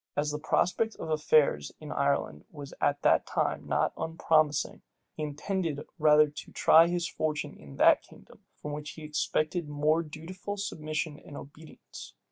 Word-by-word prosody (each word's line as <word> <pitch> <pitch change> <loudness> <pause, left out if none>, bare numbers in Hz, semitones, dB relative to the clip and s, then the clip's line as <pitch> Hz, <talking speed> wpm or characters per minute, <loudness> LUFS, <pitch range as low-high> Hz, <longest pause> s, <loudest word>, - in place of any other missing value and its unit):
As 150 +1 0
the 150 - -4
prospect 185 +8 0
of 160 - -6
affairs 150 - +2
in - - -8
Ireland 75 +1 -1
was 145 -2 -10
at 145 0 +1
that - - +3
time - - -1
not - - +1
unpromising, 160 -2 +1 0.3
he - - -6
intended 155 +1 -2 0.2
rather 150 0 +6
to 145 - -10
try 165 +1 +6
his 175 0 -1
fortune 150 -2 -3
in 70 -2 -13
that - - +5
kingdom, - - -18 0.2
from 150 - -6
which 150 0 -6
he 155 - -11
expected 155 +2 -1
more 150 +2 +2
dutiful 170 +6 -7
submission 155 -5 -4
and 145 - -11
obedience. 155 +3 -12
155 Hz, 155 wpm, -29 LUFS, 150-165 Hz, 0.3 s, rather